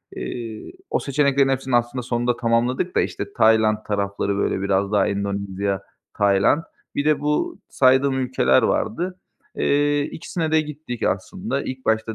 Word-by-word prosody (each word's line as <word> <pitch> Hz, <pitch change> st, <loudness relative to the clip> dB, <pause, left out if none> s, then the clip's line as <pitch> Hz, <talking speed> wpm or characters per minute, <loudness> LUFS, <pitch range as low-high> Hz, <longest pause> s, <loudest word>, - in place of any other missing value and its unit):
Eee, 115 Hz, -, -6 dB, 0.2 s
o -, -, +1 dB
seçeneklerin 140 Hz, -1 st, +2 dB
hepsini 130 Hz, -1 st, 0 dB
aslında 120 Hz, +1 st, 0 dB
sonunda 120 Hz, 0 st, 0 dB
tamamladık 120 Hz, +8 st, 0 dB
da, -, -, +4 dB
işte, 200 Hz, -, -4 dB
Tayland 110 Hz, -1 st, +4 dB
tarafları, 100 Hz, -1 st, -1 dB
böyle, 95 Hz, -, 0 dB
biraz 100 Hz, 0 st, 0 dB
daha 100 Hz, -2 st, +3 dB
Endonezya, 100 Hz, -1 st, -2 dB, 0.4 s
Tayland. 100 Hz, +10 st, +3 dB, 0.3 s
Bir 145 Hz, -, -1 dB
de 155 Hz, -1 st, +3 dB
bu 150 Hz, 0 st, -1 dB
saydığım 130 Hz, +1 st, +3 dB
ülkeler 125 Hz, -, +3 dB
vardı. 180 Hz, +8 st, -1 dB, 0.4 s
Eee, 145 Hz, 0 st, +2 dB
2'sine 160 Hz, 0 st, -4 dB
de 160 Hz, 0 st, +4 dB
gittik 150 Hz, -5 st, -7 dB
aslında. 140 Hz, -, -2 dB
İlk 130 Hz, 0 st, -6 dB
başta 110 Hz, 0 st, +1 dB
120 Hz, 145 wpm, -22 LUFS, 100-145 Hz, 0.4 s, da